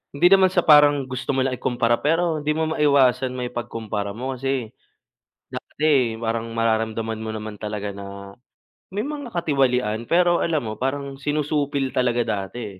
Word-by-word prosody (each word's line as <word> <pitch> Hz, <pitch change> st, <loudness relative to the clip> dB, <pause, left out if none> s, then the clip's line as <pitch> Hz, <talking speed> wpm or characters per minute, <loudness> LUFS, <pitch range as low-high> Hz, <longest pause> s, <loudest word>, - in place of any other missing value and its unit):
Hindi 175 Hz, +5 st, +5 dB
naman 190 Hz, -1 st, +7 dB
sa 180 Hz, -2 st, +1 dB
parang 145 Hz, -2 st, +6 dB
gusto 130 Hz, +1 st, -3 dB
mo 130 Hz, -, +2 dB
lang 130 Hz, -1 st, -1 dB
ikumpara, 120 Hz, -1 st, +1 dB
pero 165 Hz, +3 st, +1 dB
'di 150 Hz, +1 st, -1 dB
mo 160 Hz, 0 st, -1 dB
maiwasan 135 Hz, -4 st, +3 dB
maipagkumpara 115 Hz, -5 st, -4 dB
mo. 130 Hz, +4 st, -4 dB
Kasi, 130 Hz, -3 st, -3 dB, 0.8 s
dati 135 Hz, -7 st, 0 dB
parang 115 Hz, 0 st, -3 dB
mararamdaman 110 Hz, 0 st, -1 dB
mo 110 Hz, -, -5 dB
naman 110 Hz, -1 st, -6 dB
talaga 105 Hz, -1 st, -4 dB
na, 100 Hz, 0 st, -9 dB, 0.6 s
may 205 Hz, +5 st, -3 dB
mga 290 Hz, -3 st, -5 dB
katiwalian, 125 Hz, -, 0 dB
pero 175 Hz, 0 st, +3 dB
alam 155 Hz, -6 st, 0 dB
mo, 110 Hz, -, -4 dB
parang 140 Hz, +1 st, -2 dB
sinusupil 145 Hz, -2 st, -1 dB
talaga 120 Hz, -1 st, +1 dB
dati, 100 Hz, 0 st, -5 dB
130 Hz, 150 wpm, -23 LUFS, 110-150 Hz, 0.8 s, naman